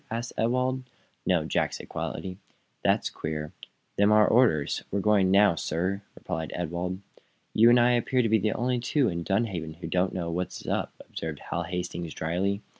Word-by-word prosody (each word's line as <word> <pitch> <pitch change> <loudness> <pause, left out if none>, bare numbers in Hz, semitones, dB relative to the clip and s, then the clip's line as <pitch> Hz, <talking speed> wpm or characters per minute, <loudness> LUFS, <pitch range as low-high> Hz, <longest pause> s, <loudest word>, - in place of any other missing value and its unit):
asked 115 +2 -4
Ewald. 130 +3 +1 0.5
"No," - - +3
said - - -7
Jack, - - 0
quietly. 95 0 -4 0.4
"That's - - +2
queer. 75 -1 -4 0.5
Them's 100 +1 +5
our 110 -1 +6
orders. 110 - +3
We're 100 - -1
going 100 -2 +3
now, 100 0 +6
sir," 90 +5 -2
replied 80 -1 -4
Ewald. 90 +2 -3 0.5
"You 115 +2 +6
and 120 +1 +6
I 120 +1 +5
appear 125 +1 +2
to - - +2
be 110 0 +4
the 105 +2 +1
only 125 +1 0
two 130 +1 +1
in 85 -1 -3
Dunhaven 95 -6 -1
who 85 - -9
don't 90 +1 +1
know 85 -2 -2
what 90 +2 -1
is - - -13
up," - - -1 0.2
observed 80 -2 -5
Hal 85 0 -1
Hastings, 85 -2 -4
dryly. 95 +6 -1
95 Hz, 180 wpm, -27 LUFS, 85-115 Hz, 0.5 s, our